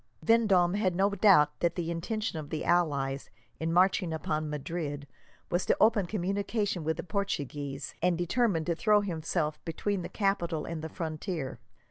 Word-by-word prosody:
Vendome 200 -6 +4
had 195 -3 +1
no 195 +2 +3
doubt 180 -8 +5
that 170 - +1
the 170 -2 -2
intention 195 +1 -3
of 145 -2 -7
the 155 - -3
allies, 140 -6 +1 0.3
in 160 +1 -1
marching 180 0 +3
upon 155 -1 -2
Madrid, 150 -1 -4 0.5
was 175 +1 +1
to - - +3
open 215 -4 +4
communication 200 0 -1
with 160 +1 -1
the - - -4
Portuguese, 145 -8 -3
and 175 0 +2
determined 175 -1 +1
to 170 - 0
throw 210 +4 +4
himself 160 -4 -2
between 190 +4 -2
the - - -6
capital 175 -6 0
and 165 -2 -5
the 160 - -5
frontier. 160 -3 -4
175 Hz, 160 wpm, -30 LUFS, 155-200 Hz, 0.5 s, doubt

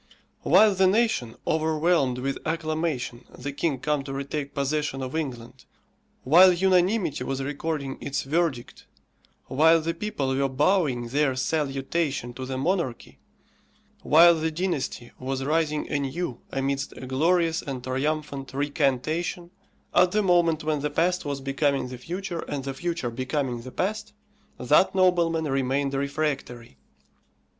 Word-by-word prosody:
While 215 -1 +5
the 190 0 +3
nation 205 - +1
overwhelmed 155 -4 +1
with 135 +2 -3
acclamation 155 -6 -2
the 145 - -5
king 145 0 -1
come 150 +2 -1
to 135 - -5
retake 140 +1 -4
possession 140 -1 -1
of 130 +3 -5
England, 130 -7 -5 0.6
while 175 +7 +7
unanimity 185 0 +2
was 135 0 -3
recording 145 -1 -3
its 140 - -2
verdict, 145 -4 -2 0.6
while 160 +4 +4
the 165 +1 -2
people 155 -8 -2
were 135 0 +1
bowing 135 -4 +1
their 140 0 +1
salutation 135 -1 -1
to 130 +1 -6
the 130 0 -3
monarchy, 135 - -2 0.8
while 170 +3 +7
the 160 0 -1
dynasty 155 -8 -3
was 135 +1 -3
rising 150 +1 0
anew 140 -1 -2
amidst 135 +1 -2
a - - -7
glorious 165 +5 +1
and 130 -3 -6
triumphant 140 +1 -2
recantation, 145 +5 -1 0.4
at 180 0 +4
the 210 0 +2
moment 170 -4 +3
when 155 -1 0
the 150 +1 -1
past 180 +4 0
was 140 -1 -3
becoming 135 -1 0
the 125 -1 -8
future, 175 +4 -5
and 140 -2 -4
the 135 0 -4
future 165 -4 -3
becoming 130 0 -2
the 130 +2 -9
past, 215 +7 -3 0.4
that 150 +10 +3
nobleman 170 -3 +2
remained 135 0 0
refractory. 140 - -3
145 Hz, 135 wpm, -25 LUFS, 135-165 Hz, 0.8 s, while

